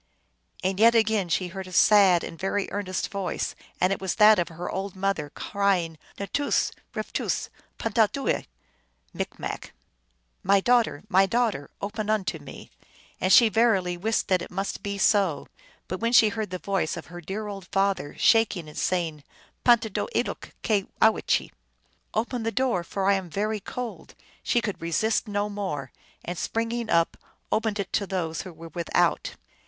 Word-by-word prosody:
" - - -27
And 190 +1 0
yet 230 +2 +6
again 220 -4 +2
she 180 +3 0
heard 190 +1 -7
a - - -10
sad 190 -2 +6
and 165 - -7
very 195 +1 -1
earnest 190 -3 -3
voice, 195 -2 -2 0.3
and 185 +2 +3
it - - -6
was 190 -2 -1
that 215 -2 +7
of 175 - 0
her 170 +1 -6
old 195 0 -4
mother, 190 -6 -1
cry 200 +4 +1
ing, 165 -2 -8
" - - -26
N 200 - -4
toos\ 285 0 +1 0.2
rftoos\pantahdooel" 225 +4 -1 0.7
M., - - -4 0.8
"My 200 +1 +4
daugh 240 +3 +4
ter! 145 - -8
my 195 -1 +4
daughter! 220 -10 0
open 210 +1 -3
unto 190 -7 0
me! 145 -2 -11 0.2
" - - -28
and 185 - +2
she 230 +4 +8
verily 200 -5 +2
wist 215 +6 0
that 185 -2 +3
it - - -6
must 195 +2 -3
be 200 0 -3
so. 195 -7 +2 0.4
But 185 - -4
when 230 +1 0
she 220 -3 +7
heard 215 -1 -3
the 185 - -4
voice 190 -2 -1
of 170 - -7
her 175 - -7
dear 200 +5 -4
old 195 -3 -7
father, 195 -7 0
shaking 215 -7 +3
and 150 - -7
saying, 165 -5 -1 0.2
" - - -33
Pantahdooe 230 - +3 0.2
loke - - -8
cyowchee!" 215 +1 +1 0.3
" - - -41
Open 235 +2 -1
the 225 0 -1
door, 245 -8 +1
for 190 +3 -3
I 200 - +6
am 190 -3 -2
very 210 +5 -1
cold! 245 +4 -7
" - - -29
she 240 - +1
could 205 -3 -4
resist 215 +8 0
no 205 0 -1
more, 190 -11 -4 0.3
and, 175 0 -4
spring 230 0 -1
ing 235 -2 -3
up, 165 -1 +2 0.3
opened 215 -1 0
it 195 - -4
to 200 - 0
those 165 -5 -2
who 185 - -8
were 165 0 -11
without. 170 0 0
195 Hz, 180 wpm, -26 LUFS, 180-220 Hz, 0.8 s, she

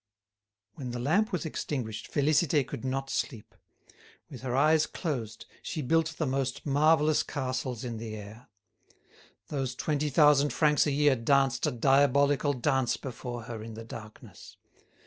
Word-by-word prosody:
When 130 +1 -7
the 120 0 -4
lamp 195 - +1
was 180 -3 -2
extinguished, 120 -8 -4
Félicité 150 0 +2
could 115 - -7
not 135 +1 -3
sleep. 110 -5 -4 0.8
With - - -9
her 125 -1 -2
eyes 155 +3 +4
closed 115 - -4 0.2
she 155 -4 -4
built 160 +4 +1
the 160 - 0
most 135 -1 -2
marvellous 150 +1 +3
castles 130 -3 -3
in 120 -2 -4
the 110 -1 -6
air. 105 +3 -11 1.0
Those 135 -3 -3
twenty 150 +2 -1
thousand 145 0 +4
francs 150 -1 +3
a - - +1
year 145 -1 +3
danced 135 +2 +2
a - - 0
diabolical 140 +3 +3
dance 125 -3 0
before 120 -1 -6
her 115 -2 -7
in 110 0 -8
the 115 0 -8
darkness. 110 -1 -11
135 Hz, 145 wpm, -29 LUFS, 120-150 Hz, 1.0 s, eyes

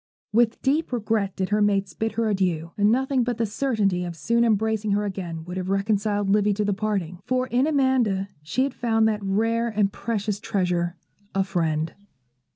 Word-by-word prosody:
With 230 0 +2
deep 290 +4 +1
regret 215 -4 0
did 190 -1 -2
her 210 0 +2
mates 200 -3 +1
bid 220 +6 -2
her 230 -1 0
adieu, 180 -5 0
and 205 +1 +3
nothing 265 +1 +2
but 240 -1 -2
the 230 - +1
certainty 205 -5 0
of 175 -1 -5
soon 235 +10 +1
embracing 220 -1 +1
her 205 +1 +1
again 175 -5 -5
would 180 +1 -6
have 185 0 -3
reconciled 205 +1 +1
Livy 205 0 +3
to 210 0 0
the 205 - +1
parting; 195 -4 -2
for 255 0 +1
in 255 +3 +1
Amanda 260 -10 +2
she 160 +13 0
had 275 -1 -1
found 225 -3 +2
that 210 -1 0
rare 225 +4 +1
and 210 -3 0
precious 210 -3 -2
treasure, 180 -4 -1 0.4
a 195 - +3
friend. 165 -4 -1
210 Hz, 185 wpm, -24 LUFS, 190-230 Hz, 0.4 s, and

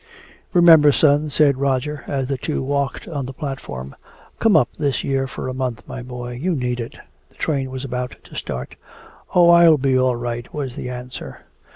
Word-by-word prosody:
"Remember, 165 -5 +7
son," 145 +1 +3
said 140 -2 +3
Roger, 140 +1 -1
as 135 -2 -1
the 135 +1 -2
two 140 +2 -3
walked 140 0 -2
on 145 -6 -4
the 135 - -7
platform. 130 - -6 0.4
"Come 220 -6 +5
up 130 - +3
this 145 -3 0
year 135 -1 0
for 130 - -6
a 130 - -3
month, 125 -4 -3
my 125 - -6
boy. 125 0 -7
You 180 +1 0
need 125 -2 -2
it." 115 - -6 0.3
The - - -29
train 135 -4 -1
was 130 +1 -5
about 125 -1 -4
to - - -14
start. 65 +1 -5 0.6
"Oh, 175 -1 +7
I'll 170 -2 +7
be 135 -1 +1
all 130 -1 +3
right," 120 0 -5
was 135 -4 -4
the 125 - -5
answer. 125 0 -8
135 Hz, 190 wpm, -21 LUFS, 125-150 Hz, 0.6 s, Remember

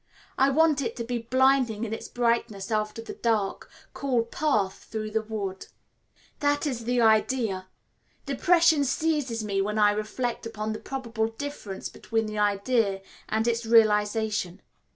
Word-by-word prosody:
I 270 +1 +4
want 305 0 +3
it 230 -3 -3
to 235 - -4
be 240 +1 -2
blinding 255 -2 +2
in 220 -1 -3
its - - -6
brightness 235 -4 -1
after 215 +1 -1
the - - -7
dark, 220 -4 -1 0.2
cool 255 -4 0
path 230 -6 -1
through 215 -1 -5
the 220 +1 +1
wood. 205 -3 -5 0.7
That 290 0 +1
is 245 -6 -3
the 245 +1 +1
idea. 220 -3 +2 0.6
Depression 320 +2 +4
seizes 275 -5 0
me 200 -2 0
when 210 +2 -2
I 210 -1 +5
reflect 225 +3 -3
upon 215 -1 -4
the 215 - -6
probable 235 -5 -3
difference 225 -5 -6
between 225 -1 -2
the 215 0 -4
idea 205 0 +1 0.3
and 220 +1 0
its 235 0 0
realisation. 215 -3 +2
225 Hz, 150 wpm, -27 LUFS, 215-255 Hz, 0.7 s, I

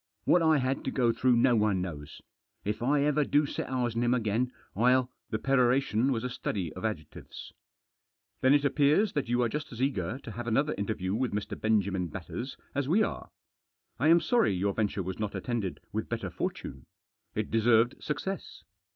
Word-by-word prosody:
What 175 - +5
I 160 -1 +4
had 130 0 -1
to - - 0
go 120 -3 +2
through 120 +2 +2
no 120 +1 +4
one 105 -3 +2
knows. 80 -6 -6 0.4
If 105 +2 -2
I 140 +3 +2
ever 150 0 +2
do 145 +1 +2
set - - -4
eyes 125 -3 -1
on 115 - 0
him 120 +1 +3
again, 120 +2 0 0.2
I'll 125 +4 +3
" - - -55
The 110 - -1
peroration 125 -1 +2
was 115 -3 -1
a 125 - -2
study 95 -8 -3
of 90 - -9
adjectives. 105 -9 -6 0.4
" - - -52
Then 130 +2 +5
it 145 0 +2
appears 150 +9 +3
that 140 -5 -2
you 120 0 +2
are - - +2
just 150 +5 -5
as 115 - -9
eager 125 -5 -1
to - - -7
have 120 +2 -6
another 140 +7 +1
interview 100 -2 -2
with 120 +2 -1
Mr. 105 0 -3
Benjamin 100 -4 0
Batters 95 - -6 0.2
as 140 -1 -1
we 205 +7 +4
are. - - -4 0.7
I 145 - +2
am 165 +1 +6
sorry 225 - +2
your 100 +2 0
venture 105 -2 -1
was 95 +3 -5
not 105 -1 -3
attended 115 -7 -3
with - - -3
better - - -3
fortune. 65 -1 -5 0.5
It - - -2
deserved 115 +2 +3
success. 155 +7 -4
120 Hz, 195 wpm, -29 LUFS, 105-135 Hz, 0.7 s, am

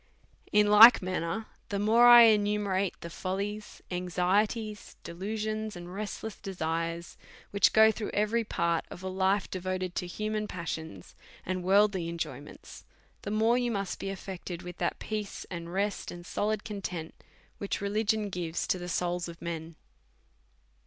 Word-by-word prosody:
In 210 0 +5
like 220 +1 +9
manner, 185 +3 -2 0.2
the 200 - -2
more 225 +4 +5
I 240 -1 +10
enumerate 205 -3 +2
the 170 - -6
follies, 200 +4 -4
anxieties, 200 +5 -1
delusions, 215 +4 -4
and 175 0 -9
restless 210 +1 -5
desires 165 -2 -4 0.3
which 200 - +4
go 220 0 +6
through 215 -1 -5
every 215 +3 +1
part 170 -6 0
of 180 - -10
a - - -3
life 190 +1 +1
devoted 185 -1 -3
to 180 - -3
human 215 +3 -3
passions 160 - -6 0.3
and 185 0 -2
worldly 190 -2 +3
enjoyments, 170 -1 -7 0.4
the - - -5
more 225 +3 +3
you 245 -1 0
must 200 -4 -3
be 195 - -4
affect 190 -1 -7
ed 175 0 -6
with 180 0 -8
that 175 - -1
peace, 210 -2 -5
and 170 -1 -6
rest, 200 +2 -2
and 175 0 -9
solid 210 +3 -1
content, 180 -6 -5 0.5
which 200 - -2
religion 210 +1 0
oives 170 -2 -3
to 185 - +1
the 175 0 -6
souls 175 0 -1
of 170 0 -10
men. 165 -1 -6
195 Hz, 150 wpm, -29 LUFS, 175-210 Hz, 0.5 s, I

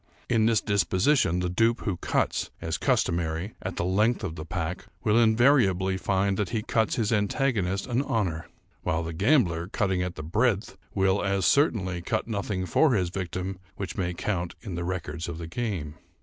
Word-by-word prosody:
In 115 -2 +3
this 115 -3 +3
disposition, 95 - +2
the 90 - 0
dupe 115 +6 +2
who 100 - -1
cuts, - - 0
as 80 -1 -3
customary, 85 +3 0
at 95 -1 -4
the - - -1
length 105 +6 +2
of 85 -5 -3
the 80 0 -7
pack, 90 0 -4 0.2
will 105 - +3
invariably 110 -5 +4
find 95 0 0
that 105 - -1
he 110 -2 -2
cuts 110 0 +1
his 115 -1 0
antagonist 105 -3 0
an 125 +1 0
honor; 95 - -1 0.3
while 80 +1 -1
the 80 0 -5
gambler, 90 - +2
cutting 95 -2 0
at 90 -1 -3
the 75 - -6
breadth, 105 +5 0 0.2
will, 95 0 +2
as 100 -2 +1
certainly, 95 - +2
cut 110 +6 -2
nothing 100 -4 -2
for 130 - +3
his 90 -4 +1
victim 95 +1 -4 0.2
which 100 -4 -5
may 90 -2 -1
count 85 -2 -2
in 100 - -6
the 85 0 -3
records 85 -2 -4
of 85 - -5
the 85 - -6
game. 85 -5 -3
95 Hz, 180 wpm, -27 LUFS, 85-110 Hz, 0.3 s, invariably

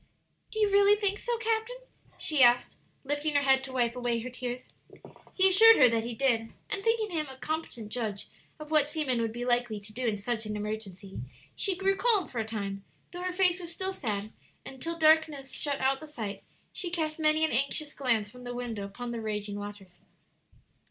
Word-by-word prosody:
"Do - - -9
you 420 -2 +3
really 405 +1 +6
think 405 -1 0
so, 480 -1 -2
captain?" 455 +2 -1 0.4
she 305 -3 +2
asked, 245 0 +5 0.3
lifting 290 +2 -1
her 285 - +4
head 265 -1 +4
to 265 - -8
wipe 240 -2 +1
away 245 -2 -1
her 250 +2 -6
tears. 250 0 -6 0.7
He 380 0 +5
assured 450 +4 +8
her 255 - +8
that 230 -1 0
he 235 -1 -4
did; 230 -3 +1 0.2
and 405 -2 -2
thinking 450 -2 +1
him 305 -2 -1
a 265 - -10
competent 285 -8 -4
judge 215 -4 -3 0.3
of 305 0 -9
what 305 -2 +4
seamen 295 -6 0
would 225 -1 -1
be 240 +2 -5
likely 240 -3 +1
to 210 +1 -12
do 250 +2 -2
in 215 -2 0
such 220 +1 -2
an 210 0 -3
emergency, 205 -2 -6 0.4
she 390 -2 +2
grew 390 +1 +2
calm 400 -4 +2
for 245 - -5
a 220 - -1
time, 200 -3 -5 0.3
though 355 -1 -7
her 365 0 -2
face 360 -1 +3
was 345 -2 -8
still 380 +3 -2
sad; 215 - -3 0.3
and 265 -1 -10
till 335 0 -3
darkness 310 -4 +3
shut 285 -2 -2
out 265 +1 +1
the 310 - -10
sight, 215 -9 -6 0.3
she 355 - -3
cast 320 -2 -2
many 310 0 +3
an 315 - -2
anxious 280 +4 0
glance 235 -6 +1
from 250 +4 -13
the 245 0 -6
window 235 -4 -4
upon 235 +5 -6
the 235 -1 -4
raging 210 -1 -3
waters. 200 -3 -10
265 Hz, 205 wpm, -29 LUFS, 225-330 Hz, 0.7 s, assured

